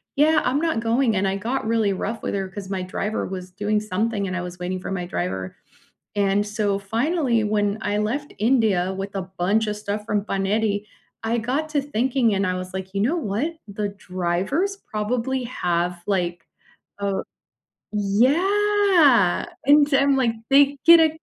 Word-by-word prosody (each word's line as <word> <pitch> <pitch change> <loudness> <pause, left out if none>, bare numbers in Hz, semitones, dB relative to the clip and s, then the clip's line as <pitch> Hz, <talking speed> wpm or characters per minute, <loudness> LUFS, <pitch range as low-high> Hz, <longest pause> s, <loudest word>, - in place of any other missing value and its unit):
"Yeah, 305 +2 +4
I'm 255 +3 +1
not 325 -7 0
going," 230 0 +1
and 190 +1 +1
I 190 - 0
got 225 +4 -2
really 225 -3 +2
rough 225 +4 -4
with - - -2
her 195 -1 -2
'cause 190 0 -8
my 190 -2 -2
driver 195 +4 -3
was 185 -1 -7
doing 210 +3 0
something 215 +1 -1
and 185 - -3
I - - -2
was 180 0 -7
waiting 180 +1 -3
for 180 - -6
my 180 -2 -2
driver. 95 - -3 0.6
And 200 0 +1
so 205 -1 0
finally, 235 - 0
when 205 0 0
I 205 -1 -1
left 255 +8 -2
India 215 -6 +2
with 195 +1 -5
a 195 - -2 0.2
bunch 205 +5 +2
of 210 0 -2
stuff 210 0 -4
from 210 -2 -1
Paneri, 205 +1 0 0.4
I 225 +1 0
got 260 +7 -1
to 295 -2 +1
thinking 255 -3 +1
and 195 0 +1
I 185 - 0
was 185 0 -6
like, 190 0 -5
"You 195 - 0
know 275 +11 +1
what? 285 - -2
The 205 +1 -3
driver's 195 - -2
probably 245 - -2
have, 175 -6 -1
like, 175 -4 -1 0.5
uh 200 -1 -1 0.7
yeah, 300 - +3 0.2
and 290 +1 +5
I'm, 275 0 +4
like, 250 -3 +2 0.2
they 280 +1 +5
get 335 0 +9
a 320 -1 +4
210 Hz, 175 wpm, -23 LUFS, 195-265 Hz, 0.7 s, get